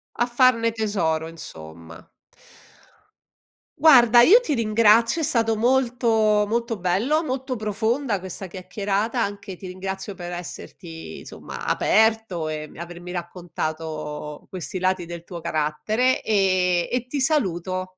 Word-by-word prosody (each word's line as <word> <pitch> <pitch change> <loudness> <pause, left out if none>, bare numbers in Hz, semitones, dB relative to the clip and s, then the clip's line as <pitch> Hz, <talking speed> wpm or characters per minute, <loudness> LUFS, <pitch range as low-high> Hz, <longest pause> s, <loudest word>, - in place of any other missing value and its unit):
A 240 - +1
farne 240 -2 +3
tesoro, 180 -8 -1
insomma. 85 - -11 1.7
Guarda 240 -6 +7
io 425 - +8
ti 310 - -2
ringrazio, 230 +5 +3
è - - -1
stato 230 -7 +1
molto 245 +1 +1 0.4
molto 230 0 -1
bello, 210 - +1
molto 260 -2 -3
profonda 220 +2 -1
questa 190 +1 -7
chiacchierata, 200 +5 -2
anche 200 -2 -4
ti 185 - -10
ringrazio 190 +2 -6
per 175 0 -7
esserti 170 -1 -8
insomma, - - -9
aperto 220 -7 +1
e 155 0 -5
mi - - -15
avermi 175 +1 -8
raccontato 155 -4 -5
questi 185 -1 -5
lati 185 -1 0
del 170 0 -8
tuo 170 -1 -8
carattere, 185 +13 0
ehm, 185 -4 +2
e 250 0 -1
ti 275 +2 -3
saluto. 185 - -1
195 Hz, 125 wpm, -23 LUFS, 175-235 Hz, 1.7 s, io